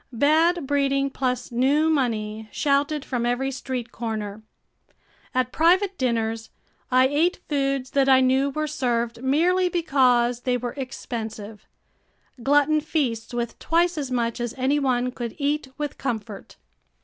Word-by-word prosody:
Bad 310 +6 +3
breeding 275 0 +1
plus 250 -2 -2
new 275 +6 +2
money 220 -7 -1
shouted 285 +1 0
from 245 -3 -2
every 245 +3 0
street 255 -3 -5
corner. 215 -2 -5 0.9
At 255 -1 0
private 370 +4 +3
dinners, 225 -5 -1 0.4
I 255 0 +5
ate 315 +6 +1
foods 275 -2 -1
that 275 -2 +2
I 260 -1 +7
knew 260 +2 +3
were 305 +2 -2
served 240 -5 -2
merely 350 +7 +2
because 255 -8 +2
they 250 0 0
were 245 0 -4
expensive, 225 -5 -6 0.7
glutton 290 +4 +3
feasts 260 -8 -2
with 240 -1 -4
twice 345 +2 +1
as 285 -4 -3
much 235 -2 -1
as 240 -1 -3
any 270 +3 +1
one 250 -2 0
could 240 -2 -6
eat 290 0 -1
with 295 -2 -4
comfort. 220 -5 -5
260 Hz, 135 wpm, -24 LUFS, 240-290 Hz, 0.9 s, I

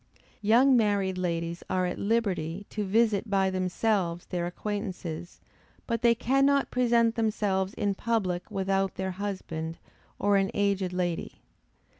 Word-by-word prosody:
Young 240 +6 +5
married 200 -5 +1
ladies 170 -1 -2
are 185 -1 +1
at 180 - -3
liberty 200 -5 -1
to 210 - -2
visit 215 +1 +2
by 195 -1 +2
themselves 185 -1 0
their 175 -1 -2
acquaintances, 180 -4 -5 0.5
but 230 -2 -1
they 235 -1 +5
cannot 275 +4 +2
present 235 -2 +3
themselves 205 -4 0
in 205 -1 0
public 195 -5 -1
without 195 0 0
their 190 0 -2
husband, 180 -4 -4 0.4
or 200 0 +3
an 195 0 +2
aged 200 -2 +1
lady. 175 -2 -3
195 Hz, 130 wpm, -28 LUFS, 180-220 Hz, 0.5 s, Young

